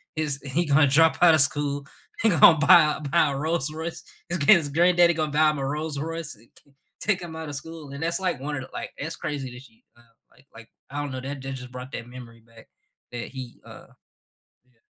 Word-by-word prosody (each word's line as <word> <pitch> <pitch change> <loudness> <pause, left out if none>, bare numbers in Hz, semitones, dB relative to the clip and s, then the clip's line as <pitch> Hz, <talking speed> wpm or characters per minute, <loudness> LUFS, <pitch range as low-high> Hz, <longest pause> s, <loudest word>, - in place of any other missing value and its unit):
he's 145 -3 -2
he 170 +5 +1
gonna 145 0 +4
drop 160 +4 +4
outta 165 -3 +7
school, 145 0 +2 0.4
he 225 - +4
gonna 165 -1 +7
buy 155 -1 +6
a - - -11
buy 170 -2 +3
a - - -4
Rolls 155 0 -1
Royce, 160 +1 -6 0.3
this 175 -1 -2
kid's 155 -1 +5
granddaddy 175 +2 +4
gonna 155 -2 -2
buy 155 0 +5
him 150 - -5
a 135 - -2
Rolls 150 0 -3
Royce, 165 -3 -5
eh 115 - -22 0.2
c 140 - -28 0.3
take 195 -4 0
him 165 -2 -8
outta 160 -2 -7
school." 150 0 -8
and 140 - -8
that's, 170 +2 -1
like, 180 -7 -2
one 145 +1 -4
of 135 - -4
the, 130 - -12
like, - - -6
it's 160 +3 -5
crazy 145 -5 -5
that 125 - -11
she, 225 - -21
um, 120 - -22 0.3
like 130 +3 -25
like, 115 0 -14 0.2
I 145 - -6
don't 145 -2 -5
know, 130 -1 -5
what 140 -1 -6 0.2
just 125 -1 -10
brought 125 +1 -9
that 115 - -6
memory 120 -2 -12
back 115 0 -19 0.5
that 120 -1 -5
he, 125 -2 -8
uh - - -13 0.8
yeah. 115 -3 -36
150 Hz, 225 wpm, -25 LUFS, 135-165 Hz, 0.8 s, outta